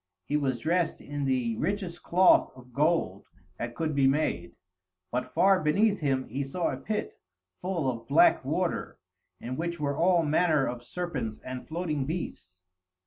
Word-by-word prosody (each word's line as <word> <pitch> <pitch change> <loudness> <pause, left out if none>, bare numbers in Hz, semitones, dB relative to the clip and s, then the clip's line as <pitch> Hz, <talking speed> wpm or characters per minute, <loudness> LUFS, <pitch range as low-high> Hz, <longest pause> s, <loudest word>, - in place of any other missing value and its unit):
He 145 - -2
was 135 -5 0
dressed 170 +1 0
in 145 -1 -4
the 125 -4 0
richest 180 - -2
cloth 185 +2 +4
of 125 -1 -15
gold 145 - +1 0.3
that 120 0 -4
could 160 -2 -1
be 140 -1 +3
made, 135 - 0 0.6
but 125 +1 -1
far 195 0 +4
beneath 200 +7 +2
him 135 -3 0
he 135 +5 -3
saw 165 +6 -1
a - - -4
pit, 210 0 -3 0.5
full 180 -6 -1
of 115 -2 -3
black - - +5
water, - - -2 0.4
in 125 +2 -5
which 170 0 -3
were 140 -1 -1
all 170 +2 +3
manner 155 -2 +3
of 120 0 -4
serpents 130 -8 -4
and 130 0 -6
floating 155 -5 -2
beasts. 90 - -6
150 Hz, 160 wpm, -28 LUFS, 130-170 Hz, 0.6 s, black